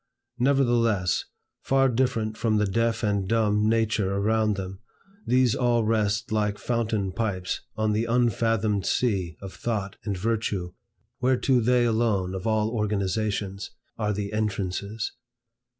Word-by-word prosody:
Nevertheless, 120 -8 +2 0.4
far 135 0 +3
different 115 -3 0
from 110 -1 +1
the 105 - +2
deaf 115 +3 0
and 100 -3 0
dumb 105 -1 +2
nature 110 -3 +1
around 110 +1 +1
them, 95 -1 -6 0.5
these 125 -2 +4
all 120 -2 +2
rest 110 -1 0
like 105 -1 0
fountain 110 -5 -1
pipes 95 -4 -2
on 110 -1 +1
the 110 +2 +1
unfathomed 115 -4 +1
sea 95 -10 0
of 95 - -7
thought 105 -4 -3
and 100 -3 -2
virtue 100 -4 -1 0.5
whereto 130 0 +2
they 120 +1 +3
alone, 110 -5 +1
of 95 +4 -4
all 110 0 +1
organizations, 100 -2 -1 0.3
are 105 -2 -1
the 100 0 -3
entrances. 105 0 -2
110 Hz, 130 wpm, -26 LUFS, 100-115 Hz, 0.5 s, these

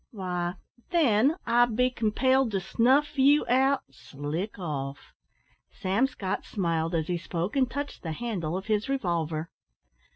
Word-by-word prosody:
"Why, 180 -4 -3 0.3
then, 280 - +3
I'd 240 -1 +3
be 250 +2 +3
compelled 255 +3 +2
to 195 - +1
snuff 265 +10 +2
you 285 +3 +5
out 265 +2 +3
slick 145 +10 -5
off?" 140 -6 -5 0.6
Sam 200 +8 0
Scott 200 -6 -4
smiled 165 -3 -1
as 160 -2 0
he 175 +1 -2
spoke, 175 +4 -3
and 260 -2 +2
touched 285 +3 -5
the 160 -2 -4
handle 180 -5 -3
of 190 - -6
his 215 +2 0
revolver. 170 - -1
205 Hz, 140 wpm, -27 LUFS, 170-260 Hz, 0.6 s, you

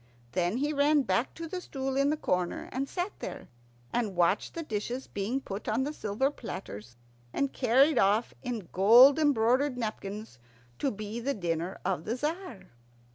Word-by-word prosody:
Then 180 +4 0
he 295 +3 0
ran 290 0 +4
back 245 0 0
to 330 0 -6
the 360 +3 -5
stool 270 -4 -4
in 275 +1 +3
the 305 - +1
corner, 180 -9 -1
and 270 +2 -2
sat 365 +2 -2
there, - - -7 0.4
and 220 -6 -1
watched 175 +3 +1
the 335 - -3
dishes 240 +1 -3
being 210 +7 -2
put 205 -6 -7
on 225 +5 +1
the 295 +3 -3
silver 240 +4 -1
platters 120 - -8 0.4
and 280 - -1
carried 265 +4 +4
off 210 +4 +2
in 235 -8 -4
gold 240 - +7
embroidered 260 -1 +3
napkins 215 - -5 0.4
to 275 - +1
be 215 0 -5
the 275 +4 -1
dinner 170 -1 -2
of 180 -3 -1
the 225 - -1
Tzar. 295 - -4
240 Hz, 170 wpm, -29 LUFS, 200-280 Hz, 0.4 s, gold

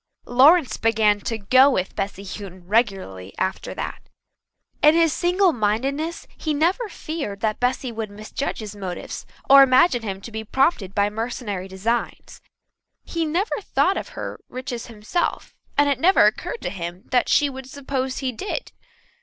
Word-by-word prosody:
Lawrence 280 +5 +5
began 220 -2 +3
to 225 +2 -3
"go 255 +7 +5
with" 185 -8 -1
Bessy 195 0 -3
Houghton 190 -2 -8
regularly 190 - -1
after 190 0 -2
that. - - -6 0.7
In 300 +1 +6
his 330 -2 +4
single 360 0 +2
mindedness 270 +9 -1
he 310 -2 -2
never 365 +10 +1
feared 280 - -5
that 215 -1 0
Bessy 250 0 0
would 220 -2 -4
misjudge 215 +7 -5
his 210 -1 -7
motives 190 -3 -6 0.2
or 275 0 +9
imagine 260 0 +5
him 195 -3 -4
to 230 - -9
be 220 0 -5
prompted 220 - +1
by 205 0 +2
mercenary 215 -4 -4
designs. 205 +5 -3 0.6
He 335 -1 -2
never 360 +8 -1
thought 385 0 +1
of - - -4
her - - -5
riches 250 -2 -5
himself, 230 +10 -3 0.2
and 290 0 +5
it 280 -3 +1
never 370 +7 +5
occurred 485 - -1
to - - -2
him 175 -1 -6
that 250 -1 +2
she 290 - +4
would 265 -1 -8
suppose 265 -1 -3
he 265 -2 -1
did. 400 - -5
245 Hz, 160 wpm, -23 LUFS, 205-290 Hz, 0.7 s, or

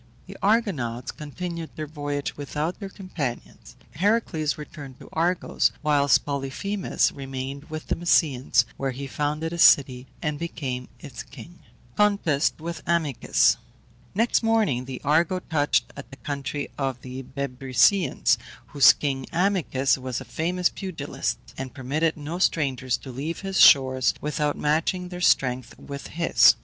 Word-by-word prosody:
The - - -10
Argonauts 175 - 0
continued 165 +2 -6
their 155 - -4
voyage 145 -1 -4
without 150 +4 -3
their 200 -2 -6
companions; 175 - -6 0.2
Heracles 180 -4 0
returned 145 -4 -10
to - - -13
Argos, 170 +2 +1
whilst 145 -3 +3
Polyphemus 145 +8 -1
remained 135 +1 -6
with 155 -1 -7
the - - -1
Mysians, 150 -6 +3
where 135 - -1
he 135 +2 -5
founded 150 +4 -2
a 170 - -5
city 130 -5 +5
and 150 -3 -2
became 130 -7 -4
its 140 -7 -8
king. 140 +7 -12 0.4
CONTEST 200 -10 +2
WITH 165 0 -5
AMYCUS. 160 -6 +2 0.6
Next 230 +4 +2
morning 220 - +1
the 130 -1 -6
Argo 160 +5 +2
touched 155 -5 0
at 140 - -9
the 135 - -12
country 140 0 -4
of 135 -3 -2
the 130 +1 -6
Bebrycians, 135 - +2 0.3
whose 140 -2 +7
king 135 -3 -3
Amycus 165 -8 +1
was 130 -1 -3
a - - -9
famous 180 +2 0
pugilist, 165 -7 -4 0.2
and 130 0 -6
permitted 150 +5 0
no 155 +4 -5
strangers 130 -8 +1
to 130 - -10
leave 145 +7 -4
his 195 -1 -2
shores 130 -3 +6
without 150 0 -1
matching 165 +4 0
their 180 0 -7
strength 130 -7 +2
with 140 0 -8
his. 170 +1 +5
145 Hz, 140 wpm, -25 LUFS, 135-170 Hz, 0.6 s, whose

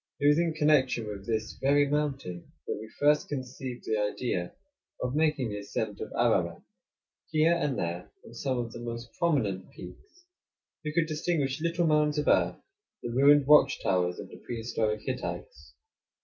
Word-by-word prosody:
It 145 - -1
was 145 +2 +5
in 165 -2 0
connection 145 -6 +3
with 100 -2 -7
this 110 -1 -2
very 145 +1 +4
mountain 140 -12 -2
that - - -2
we 110 +1 -8
first 150 +1 +3
conceived 130 -2 -6
the 110 - 0
idea 105 -3 -2 0.4
of 125 0 -2
making 150 -5 +1
the 105 0 -4
ascent 105 +1 -4
of - - -5
Ararat. - - +1 0.7
Here 155 +2 +4
and 150 -6 0
there, 85 +1 -3 0.2
on - - -12
some 130 +2 -2
of 120 -1 -3
the 120 - -8
most 115 0 -6
prominent 115 - 0
peaks, 365 -3 -13 0.6
we 150 - -2
could 165 +1 +2
distinguish 155 -3 -1
little 170 +1 +1
mounds 150 -1 +3
of 150 - -1
earth, - - +3 0.5
the 120 - -3
ruined 140 +3 +5
watch 150 +1 +6
towers 90 -1 +1
of - - -8
the - - -11
prehistoric 110 -2 -2
Hittites. 130 - -5
135 Hz, 165 wpm, -29 LUFS, 110-150 Hz, 0.7 s, watch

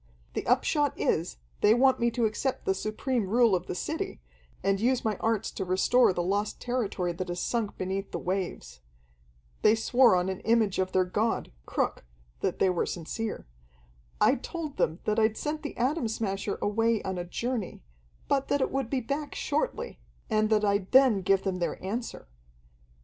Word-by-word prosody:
"The - - -3
upshot 285 +3 +2
is, 165 +3 0 0.2
they 210 +2 +5
want 265 +1 +4
me 235 - +3
to 235 0 0
accept 250 +5 -2
the 190 - +2
supreme 215 +2 -2
rule 235 0 +4
of 180 -1 0
the - - -3
city, - - -3 0.4
and 195 0 +2
use 245 +3 +1
my 215 -1 +1
arts 225 -1 0
to 195 - -4
restore 190 +7 +4
the 175 -1 -1
lost 205 +3 -1
territory 210 -8 -1
that 185 +2 -5
has 175 0 -3
sunk 230 -4 -2
beneath 190 +1 -3
the - - -4
waves. 175 - -4 0.8
They 215 - +5
swore 235 -1 +4
on 180 0 +1
an 190 -1 -3
image 225 -4 +2
of 185 0 0
their 185 -1 +3
god, 210 - -1 0.2
Cruk, - - -1 0.4
that - - -1
they 190 - +3
were 175 - 0
sincere. 210 +6 -4 0.7
I - - +4
told 310 +2 -6
them 160 - +1
that 215 +1 +1
I'd 220 0 +2
sent 305 +1 -3
the 295 - -6
Atom 260 +1 +1
Smasher 200 -2 -2
away 225 +1 +1
on 190 -1 -3
a - - -2
journey, 225 - -4 0.4
but 275 -1 +1
that 285 - +1
it - - 0
would 270 -3 -1
be 265 -2 0
back 280 +5 -4
shortly, 485 -1 -2 0.3
and 215 0 +2
that 215 -1 +3
I'd 200 -2 0
then 255 -7 +6
give 190 +1 +2
them 190 -2 -2
their 175 - -1
answer. 220 - -4
215 Hz, 180 wpm, -28 LUFS, 190-245 Hz, 0.8 s, then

